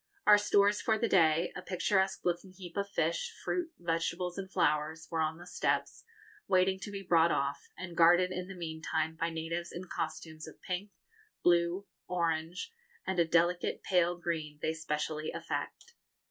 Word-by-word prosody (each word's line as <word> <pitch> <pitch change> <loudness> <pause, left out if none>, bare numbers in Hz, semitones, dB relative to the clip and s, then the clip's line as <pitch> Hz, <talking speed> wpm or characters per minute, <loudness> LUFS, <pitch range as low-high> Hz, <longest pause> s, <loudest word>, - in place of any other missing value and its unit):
Our 210 0 +8
stores 205 0 +3
for 220 -1 +2
the 230 +1 +1
day, 165 -3 +3
a - - -5
picturesque 190 +1 0
looking 175 +2 -1
heap 180 -2 -10
of 200 0 -1
fish, 170 - 0
fruit, 350 -2 -1
vegetables, 170 +1 -1
and 195 -1 -6
flowers, 155 +1 +1
were 165 -1 0
on 160 0 0
the 175 - -11
steps, - - -1 0.4
waiting 190 0 +3
to 200 - -6
be 200 -1 -5
brought 170 -2 +4
off, 140 +1 -1
and 175 -2 -7
guarded 175 +2 +6
in 180 0 -4
the 195 - -8
meantime 160 -1 -2
by 165 +1 -1
natives 165 +1 -4
in 175 - -6
costumes 160 -1 -4
of 160 - -12
pink, 185 +2 -4 0.5
blue, 175 +2 +3 0.2
orange, 170 - -1 0.3
and 190 -2 -1
a 170 - +5
delicate 175 +2 +1
pale 175 -1 +2
green 160 -4 -3
they 160 - +1
specially 155 -1 -2
affect. 470 - -5
175 Hz, 165 wpm, -32 LUFS, 160-190 Hz, 0.5 s, Our